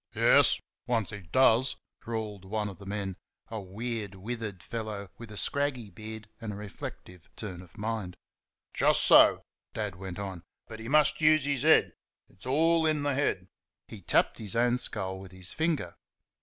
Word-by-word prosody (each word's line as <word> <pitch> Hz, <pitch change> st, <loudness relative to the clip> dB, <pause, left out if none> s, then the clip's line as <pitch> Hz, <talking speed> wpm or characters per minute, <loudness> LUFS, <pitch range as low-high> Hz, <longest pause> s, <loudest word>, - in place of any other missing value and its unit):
"Yes! -, -, +6 dB, 0.3 s
Once 115 Hz, -4 st, 0 dB
he 105 Hz, -2 st, -7 dB
DOES!" 130 Hz, 0 st, +5 dB, 0.3 s
drawled 110 Hz, -4 st, -4 dB
one 105 Hz, +2 st, -2 dB
of 95 Hz, -, -11 dB
the 100 Hz, -, -11 dB
men, 100 Hz, -2 st, -3 dB, 0.3 s
a 110 Hz, -2 st, -4 dB
weird, 105 Hz, +1 st, -4 dB
withered 105 Hz, -2 st, -5 dB
fellow 105 Hz, -3 st, -5 dB
with 115 Hz, -2 st, -9 dB
a 105 Hz, -, -7 dB
scraggy 135 Hz, -6 st, -1 dB
beard 110 Hz, +3 st, -8 dB
and 110 Hz, -2 st, -4 dB
a -, -, -6 dB
reflective 95 Hz, -3 st, -9 dB
turn 95 Hz, -5 st, -6 dB
of 90 Hz, +2 st, -17 dB
mind. 105 Hz, -4 st, -3 dB, 0.6 s
"Jusso," -, -, +6 dB, 0.3 s
Dad 105 Hz, -4 st, -3 dB
went 95 Hz, -1 st, -7 dB
on, 95 Hz, -4 st, -5 dB, 0.3 s
"but 110 Hz, -, -9 dB
he 110 Hz, -, -7 dB
must 150 Hz, +3 st, +3 dB
use 155 Hz, -2 st, +5 dB
his 140 Hz, -3 st, 0 dB
HEAD; -, -, +5 dB, 0.4 s
it's 95 Hz, +6 st, -14 dB
all 160 Hz, +4 st, +3 dB
in 155 Hz, -2 st, +1 dB
th' 145 Hz, -1 st, +1 dB
head." 115 Hz, -9 st, 0 dB, 0.4 s
(He 110 Hz, -, -10 dB
tapped 85 Hz, -, +2 dB
his 105 Hz, -3 st, -5 dB
own 120 Hz, +1 st, +3 dB
skull 95 Hz, -5 st, -2 dB
with 95 Hz, -2 st, -11 dB
his 95 Hz, -1 st, -6 dB
finger). 160 Hz, -2 st, -1 dB
110 Hz, 170 wpm, -29 LUFS, 95-120 Hz, 0.6 s, Yes